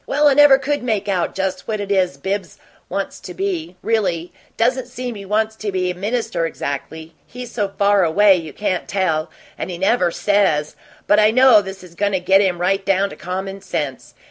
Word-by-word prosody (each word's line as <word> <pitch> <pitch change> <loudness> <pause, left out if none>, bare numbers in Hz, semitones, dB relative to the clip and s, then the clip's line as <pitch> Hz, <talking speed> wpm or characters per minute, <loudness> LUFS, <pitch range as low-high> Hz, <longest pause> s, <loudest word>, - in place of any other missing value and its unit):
Well, 295 +1 +3
I - - +4
never 290 -1 +7
could 285 +1 -2
make 215 -4 -1
out 185 -4 -1
just 190 -1 -3
what 215 -1 -2
it 200 0 -4
is 185 -7 +1
Bibbs 190 +5 -4 0.3
wants 195 0 -4
to 180 - -10
be, 180 -3 -3
really; 185 -7 -1 0.2
doesn't 250 +2 +1
seem 250 -1 -5
he 200 -2 -9
wants 215 +2 0
to 215 -2 -3
be 185 -1 -1
a - - -7
minister 200 -4 -2
exactly 160 +2 -6
he's 250 -1 -9
so 210 -4 -1
far 200 -1 +3
away 195 +4 +5
you 165 -3 -5
can't 185 -1 -2
tell, 170 -5 0 0.3
and - - -4
he 175 - -5
never 190 0 +2
SAYS 170 -6 +1 0.3
but 205 - +4
I 215 0 +5
know 250 -2 +6
this 190 -1 -9
is 175 -2 -14
goin' 200 +3 -1
to 190 - +1
get 190 +2 +4
him 185 -3 0
right 195 +2 +1
down 195 0 +1
to - - -9
common 190 +2 -5
sense. 145 -8 -5
195 Hz, 205 wpm, -19 LUFS, 180-215 Hz, 0.3 s, never